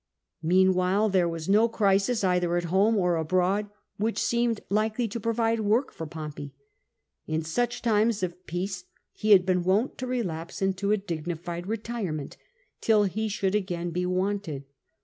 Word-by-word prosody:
Meanwhile 185 Hz, +4 st, +3 dB
there 185 Hz, -3 st, +2 dB
was 165 Hz, -1 st, -5 dB
no 215 Hz, +4 st, +4 dB
crisis 205 Hz, +1 st, +2 dB
either 180 Hz, -2 st, +2 dB
at 175 Hz, -, -1 dB
home 210 Hz, +4 st, +4 dB
or 180 Hz, -3 st, +2 dB
abroad 185 Hz, +5 st, +1 dB, 0.3 s
which 220 Hz, +2 st, -1 dB
seemed 235 Hz, -2 st, +1 dB
likely 215 Hz, +3 st, 0 dB
to 225 Hz, +2 st, -5 dB
provide 230 Hz, +1 st, 0 dB
work 220 Hz, +5 st, +1 dB
for 160 Hz, -, -7 dB
Pompey. 150 Hz, -3 st, -7 dB, 0.7 s
In 155 Hz, +1 st, -1 dB
such 240 Hz, +10 st, -1 dB
times 220 Hz, -2 st, +2 dB
of 180 Hz, 0 st, -5 dB
peace 180 Hz, +1 st, -3 dB, 0.3 s
he 215 Hz, -, -3 dB
had 190 Hz, -3 st, +7 dB
been 180 Hz, -1 st, +1 dB
wont 200 Hz, +8 st, +1 dB
to 255 Hz, -, -3 dB
relapse 175 Hz, -10 st, -3 dB
into 195 Hz, +1 st, 0 dB
a 215 Hz, -, +4 dB
dignified 175 Hz, -1 st, -5 dB
retirement 210 Hz, -9 st, -4 dB, 0.5 s
till 215 Hz, -2 st, +4 dB
he 215 Hz, +3 st, -1 dB
should 195 Hz, -1 st, -1 dB
again 175 Hz, -4 st, -1 dB
be 180 Hz, +2 st, -1 dB
wanted. 185 Hz, -5 st, -2 dB
195 Hz, 155 wpm, -27 LUFS, 175-215 Hz, 0.7 s, had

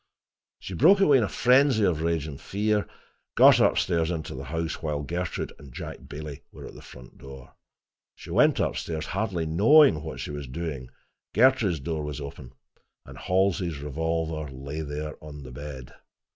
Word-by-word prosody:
She 95 Hz, -, -8 dB
broke 170 Hz, -, +5 dB
away 145 Hz, -9 st, +5 dB
in -, -, +1 dB
a 100 Hz, -, -2 dB
frenzy 130 Hz, -2 st, +4 dB
of 85 Hz, -5 st, +1 dB
rage 80 Hz, -2 st, 0 dB
and 70 Hz, -3 st, -8 dB
fear, 105 Hz, +2 st, 0 dB
and 105 Hz, -, -3 dB, 0.5 s
got -, -, +7 dB
into 85 Hz, -3 st, +1 dB
the 65 Hz, -, -7 dB
house 80 Hz, +2 st, -4 dB
while 75 Hz, -2 st, -2 dB
Gertrude 85 Hz, +3 st, -4 dB
and 70 Hz, -3 st, -13 dB
Jack -, -, -8 dB
Bailey 75 Hz, -1 st, -7 dB
were -, -, -11 dB
at -, -, -10 dB
the -, -, -12 dB
front 60 Hz, 0 st, -14 dB
door. 65 Hz, -1 st, -12 dB, 0.6 s
She -, -, -11 dB
went -, -, +4 dB
up -, -, 0 dB
stairs, 80 Hz, -2 st, -4 dB
hardly 95 Hz, -4 st, -2 dB
knowing 100 Hz, -, +5 dB
what 80 Hz, +1 st, -7 dB
she -, -, -5 dB
was 75 Hz, -2 st, -6 dB
doing. 70 Hz, -2 st, -5 dB, 0.5 s
Gertrude's 115 Hz, -, +4 dB
door 80 Hz, +2 st, -3 dB
was 75 Hz, -1 st, -5 dB
open, 70 Hz, -3 st, -9 dB, 0.5 s
and -, -, -12 dB
Halsey's 90 Hz, -3 st, 0 dB
revolver 80 Hz, +1 st, -3 dB
lay 70 Hz, +4 st, -6 dB
there 75 Hz, 0 st, -6 dB
on 75 Hz, -2 st, -9 dB
the 65 Hz, -, -10 dB
bed. 65 Hz, -1 st, -9 dB
80 Hz, 170 wpm, -26 LUFS, 70-95 Hz, 0.6 s, got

